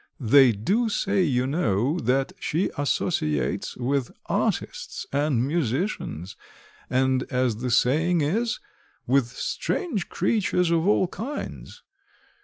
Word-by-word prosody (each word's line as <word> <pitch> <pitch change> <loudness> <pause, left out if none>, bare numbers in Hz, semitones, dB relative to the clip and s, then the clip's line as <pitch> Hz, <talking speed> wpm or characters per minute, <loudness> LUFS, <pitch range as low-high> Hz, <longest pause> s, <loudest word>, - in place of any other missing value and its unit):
They 130 0 +6
do 200 - 0
say, 200 -1 +1
you 130 -7 +1
know 135 - 0
that 135 +1 0
she 165 +5 -1
associates 105 - -1
with 130 +1 -1 0.2
artists - - -2
and 140 -3 +1
musicians, 135 - -2 0.5
and 130 0 +2
as 125 -4 0
the 125 +2 -3
saying 155 +8 +3
is, 225 +11 0 0.5
with 130 -1 +3
strange 245 - -2
creatures 180 -5 +1
of 165 +2 +2
all 195 -2 +3
kinds. 245 +11 -7
140 Hz, 110 wpm, -25 LUFS, 125-180 Hz, 0.5 s, They